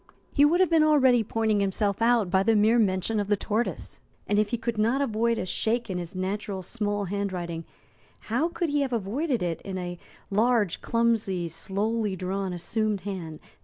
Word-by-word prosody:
He 285 - +5
would 335 +4 +3
have 370 - +4
been 325 -1 +5
already 265 -6 +5
pointing 220 -1 0
himself 200 +1 0
out 230 -5 +3
by 190 0 +4
the 225 +3 +3
mere 220 +3 +4
mention 200 +1 +1
of 205 - -1
the 205 0 +2
tortoise. 220 +4 -2 0.3
And, 205 - +1
if 210 -1 +1
he 235 - -1
could 230 -1 -3
not 230 +5 +2
avoid 230 -3 +1
a - - -2
shake 225 +4 -1
in 180 - -2
his 175 +1 -7
natural, 190 +1 -3
small 205 0 -2
handwriting, 180 -4 -3 0.6
how 245 +9 0
could 345 -1 -2
he 290 0 +1
have 265 -3 -1
avoided 235 - -1
it 170 -2 -2
in 190 -1 -5
a 175 -1 -5 0.3
large, 215 -2 +2
clumsy, 225 -7 +1
slowly 205 +4 -1
drawn, 190 +1 -3
assumed 210 +3 -1
hand? 175 -5 -6
210 Hz, 185 wpm, -26 LUFS, 190-235 Hz, 0.6 s, He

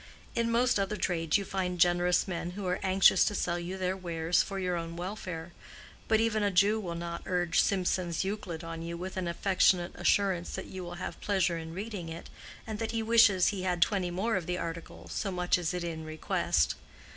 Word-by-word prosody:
In 230 0 0
most 240 -1 +3
other 195 +2 -1
trades 165 -2 +1
you 200 - -4
find 180 -2 -2
generous 175 +1 +3
men 175 -1 -4
who 200 - -4
are 180 0 0
anxious 190 0 +5
to 205 - 0
sell 175 -2 -1
you 180 +2 -5
their 185 0 -1
wares 170 -2 +1
for 195 - -4
your 180 -2 -1
own 165 0 -4
welfare; 175 -2 -5 0.6
but 220 -1 +3
even 225 -1 +1
a 205 - +2
Jew 200 +3 +3
will 175 -5 -4
not 170 0 -5
urge 175 -2 +1
Simson's 180 -3 0
Euclid 190 -4 -4
on 165 0 -6
you 170 +1 -5
with 185 +2 -6
an 185 -2 -2
affectionate 180 0 +2
assurance 180 -1 +1
that - - -5
you 185 -1 -7
will 175 0 -7
have 175 - -6
pleasure 185 -4 +1
in 160 0 -8
reading 200 -4 -5
it, 165 +1 -8 0.3
and 220 -3 -5
that 225 0 -2
he 225 -1 0
wishes 220 -5 +5
he 200 -3 -3
had 180 -1 0
twenty 185 0 +2
more 195 +5 0
of 175 - -4
the 180 0 -1
article, 170 -1 -6
so 195 - -3
much 180 0 +1
is 170 -2 -1
it 180 -1 -3
in 165 -2 -4
request. 155 - 0
180 Hz, 210 wpm, -30 LUFS, 170-195 Hz, 0.6 s, anxious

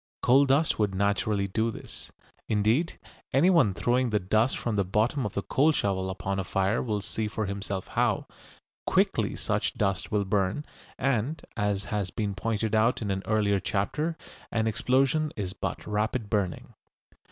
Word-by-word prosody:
Coal 135 +3 +6
dust 140 +1 +2
would 100 -3 +1
naturally 100 0 +1
do 110 +4 0
this. 115 - -8 0.4
Indeed 110 +10 +1 0.4
anyone 140 - +4
throwing 125 +3 +1
the 105 - +2
dust 110 +7 +1
from 115 -3 -2
the 100 - +2
bottom 110 +7 +1
of 100 - -10
the 100 - -1
coal 150 +4 +3
shovel 95 -8 0
upon 95 +1 -3
a - - -1
fire 95 +4 0
will 105 -4 -1
see 110 +2 -2
for 110 0 -2
himself 100 -1 -4
how, - - +1 0.6
quickly - - +2
such - - -1
dust 100 -2 -1
will 105 -2 +1
burn, 100 +7 0 0.3
and, 135 +3 0
as 100 -1 0
has 100 -3 0
been 105 +1 -2
pointed 110 +2 -2
out 110 +2 +3
in 100 - -1
an 95 0 -1
earlier 105 -2 +2
chapter, 150 - -1 0.3
an 110 -1 +1
explosion 135 +7 +2
is 95 -4 -3
but - - -4
rapid 105 +1 -1
burning. 100 -5 -1
105 Hz, 165 wpm, -28 LUFS, 100-120 Hz, 0.6 s, Coal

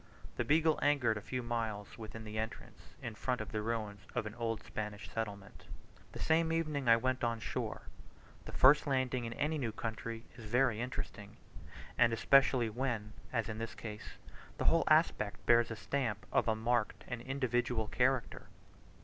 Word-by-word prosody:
The - - +1
Beagle 160 +1 +3
anchored 140 -6 +3
a - - -5
few 125 +4 -4
miles 115 -4 -3
within 110 0 -8
the 110 0 -4
entrance, 110 0 -7
in 115 - -4
front 125 +4 -1
of 110 - -5
the 110 - -1
ruins 105 -2 -3
of - - 0
an 105 - -5
old 115 -1 -3
Spanish 105 -1 -5
settlement. 105 -3 -6 0.5
The - - -7
same 160 0 +2
evening 155 -6 0
I 115 - +8
went 130 +2 -1
on 115 -1 0
shore. - - -4 0.6
The - - -7
first 145 +3 +6
landing 130 -2 0
in 115 - -4
any 150 +5 -1
new 120 -5 -1
country 115 +1 -5
is 120 - -9
very 120 0 +2
interesting, 120 -5 -5 0.6
and 115 0 +5
especially 130 +1 +4
when, 110 -2 -2 0.2
as 115 -4 0
in 110 0 -5
this 115 -1 -4
case, 105 -2 -8 0.4
the - - -2
whole - - +4
aspect - - +2
bears 120 -1 +5
the 110 - -5
stamp 110 0 -2
of - - +2
a 110 - +3
marked 110 -3 0
and 125 -2 -4
individual 125 -3 0
character. 130 0 0
115 Hz, 175 wpm, -34 LUFS, 110-130 Hz, 0.6 s, I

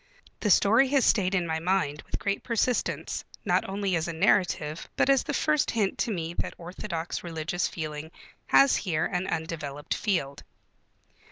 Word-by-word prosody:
The 210 - 0
story 225 +7 +5
has 275 -1 +3
stayed 195 -3 +3
in 180 -3 +1
my 160 -1 -1
mind 165 -4 0
with - - -3
great 200 -1 -2
persistence, 240 +1 -1 0.2
not - - +1
only 195 -1 -1
as 165 0 -1
a 170 - -3
narrative, 165 -3 +1
but 275 - +3
as 270 -2 +4
the - - -4
first 305 0 +1
hint 210 -5 0
to 235 - 0
me 170 -4 -3
that - - -3
orthodox 175 -1 -5
religious 170 +1 -2
feeling 155 -1 -5 0.4
has 275 -1 +5
here 160 -5 -1
an 180 0 -2
undeveloped 150 -4 -3
field. 140 -10 -1
180 Hz, 165 wpm, -27 LUFS, 160-205 Hz, 0.4 s, story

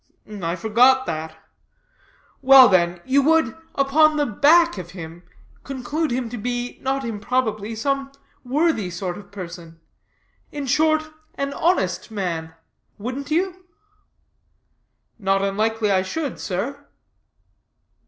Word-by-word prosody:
"I 170 0 -1
forgot 245 +7 +4
that. 160 0 -5 1.0
Well 265 -1 +9
then, 175 -2 +2
you 270 +2 +3
would, 310 -5 +2 0.2
upon 300 +3 +3
the 295 - +2
back 300 - +4
of 175 -1 -8
him, 165 0 -9 0.4
conclude 275 +4 -3
him 245 0 -2
to 245 - -5
be, 245 +2 -4
not 270 0 -1
improbably, 220 -1 -2
some 275 +4 -2 0.3
worthy 270 - 0
sort 180 0 -4
of 205 +1 -13
person; 170 -4 -9 0.7
in 290 -1 -5
short, 310 +3 +2 0.3
an 275 0 -3
honest 260 - 0
man: 170 -6 -4 0.4
wouldn't 255 +7 -5
you?" 370 +3 -1 1.6
"Not 195 -1 +1
unlikely 215 +2 0
I 190 -1 +3
should, 285 +9 -4
sir." 210 +9 -4
240 Hz, 115 wpm, -22 LUFS, 190-280 Hz, 1.6 s, Well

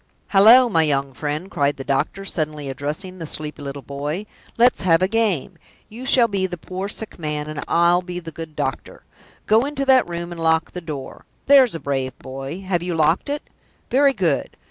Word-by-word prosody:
Hallo, 225 +6 +7
my 165 -8 +2
young 140 -3 0
friend!" 150 +7 -4
cried 140 0 0
the 135 - -6
doctor, 140 +8 -1
suddenly 150 -5 -3
addressing 150 +8 -4
the 165 - -5
sleepy 150 -1 -4
little 140 -1 -6
boy. 145 +8 -4 0.3
"Let's 240 +2 +4
have 175 -1 +3
a - - +3
game. 210 - 0 0.3
You 245 +5 -8
shall 245 -3 +5
be 195 -3 -1
the 175 - -6
poor 185 +4 -5
sick 220 -2 -7
man, 150 -2 -3
and 155 -1 -5
I'll 170 +1 +4
be 180 0 -7
the 165 -2 -9
good 160 -1 -9
doctor. 135 -3 -4 0.4
Go 220 +3 +4
into 280 -1 -2
that 260 -7 +4
room 170 0 -5
and 170 -1 -6
lock 160 0 +2
the 180 - -6
door. 150 -5 -7 0.2
There's 265 -7 +6
a - - -4
brave 135 -3 -3
boy! 135 +6 -7
Have 185 -3 -1
you 175 -1 -3
locked 160 - +2
it? 290 +1 -2 0.5
Very 275 +2 +4
good! 190 -8 -1
170 Hz, 195 wpm, -21 LUFS, 150-195 Hz, 0.5 s, Hallo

